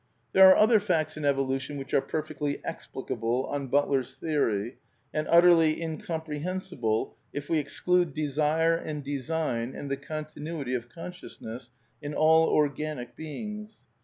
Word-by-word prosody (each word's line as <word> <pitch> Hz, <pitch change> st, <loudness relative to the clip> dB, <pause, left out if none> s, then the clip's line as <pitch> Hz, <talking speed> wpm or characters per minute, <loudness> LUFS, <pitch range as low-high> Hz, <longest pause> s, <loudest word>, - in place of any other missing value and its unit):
There 190 Hz, 0 st, +9 dB
are 185 Hz, -, +7 dB
other 220 Hz, +1 st, +6 dB
facts 165 Hz, -6 st, 0 dB
in 155 Hz, -, -6 dB
erolution 135 Hz, 0 st, 0 dB
which 135 Hz, -1 st, -7 dB
are -, -, +4 dB
perfectly 155 Hz, -1 st, -3 dB
\^ -, -, -12 dB
explicable 125 Hz, -5 st, -3 dB
on 140 Hz, -1 st, -3 dB
Butler's 135 Hz, -1 st, +1 dB
theory, 125 Hz, -7 st, -1 dB, 0.3 s
and 155 Hz, -, -1 dB
utterly 170 Hz, -2 st, +6 dB
incomprehensible^j^ 160 Hz, -, -3 dB, 0.2 s
if 145 Hz, 0 st, -5 dB
we 160 Hz, -, +3 dB
exclude 175 Hz, +4 st, +1 dB
desire 155 Hz, +2 st, +2 dB
and 155 Hz, -3 st, -4 dB
design 140 Hz, -3 st, -2 dB
and 140 Hz, -, -6 dB
the 140 Hz, -, 0 dB
continuity 155 Hz, -1 st, -5 dB
of 120 Hz, -1 st, -3 dB
con 165 Hz, +7 st, -7 dB
sciousness 120 Hz, -8 st, -9 dB, 0.3 s
in 145 Hz, 0 st, -5 dB
all 160 Hz, +1 st, +5 dB
organic 145 Hz, -4 st, -1 dB
beings. 210 Hz, -, -7 dB
150 Hz, 140 wpm, -28 LUFS, 135-165 Hz, 0.3 s, There